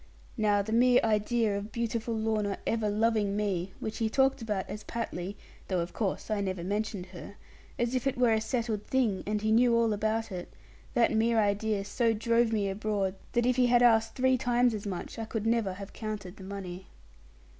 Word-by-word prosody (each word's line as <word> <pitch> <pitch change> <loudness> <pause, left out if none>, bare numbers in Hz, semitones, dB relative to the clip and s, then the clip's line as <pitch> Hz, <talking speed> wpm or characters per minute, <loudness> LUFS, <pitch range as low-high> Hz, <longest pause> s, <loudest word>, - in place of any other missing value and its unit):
Now 210 -3 +2
the 220 - -5
mere 245 +2 +5
idea 220 0 +1
of 200 +2 -5
beautiful 230 0 -2
Lorna 215 -2 0
ever 225 -2 0
loving 210 -1 +1
me, 190 -3 -1
which 220 +2 -5
he 225 -1 +1
talked 270 +2 +2
about 210 -4 -2
as 210 - -7
patly 200 -4 -4 0.3
(though 185 -2 0
of 170 +1 -3
course 210 0 -2
I 210 -1 +1
never 185 -3 -3
mentioned 205 0 -2
her) 185 +3 -9 0.4
as 240 +1 0
if 255 +1 0
it 270 - -1
were 245 -2 +4
a 220 - +1
settled 225 -3 -2
thing, 235 -8 +1
and 210 0 -1
he 215 - +2
knew 235 +1 +5
all 230 -2 +3
about 220 +1 -1
it, 180 -1 -6 0.4
that 240 -2 +4
mere 225 +1 +2
idea 205 0 +1
so 230 +2 +1
drove 230 +1 +2
me 210 -3 +1
abroad, 200 -1 -1 0.2
that 240 -1 +2
if 250 0 +2
he 250 -1 +4
had 245 0 +4
asked 225 -2 +4
three 260 0 +3
times 245 0 +2
as 210 -1 -4
much, 190 +3 -5
I 225 - -3
could 220 -1 -4
never 225 -4 +1
have 200 +1 -9
counted 210 -4 -6
the 190 - -10
money. 190 -2 -7
220 Hz, 200 wpm, -29 LUFS, 200-235 Hz, 0.4 s, mere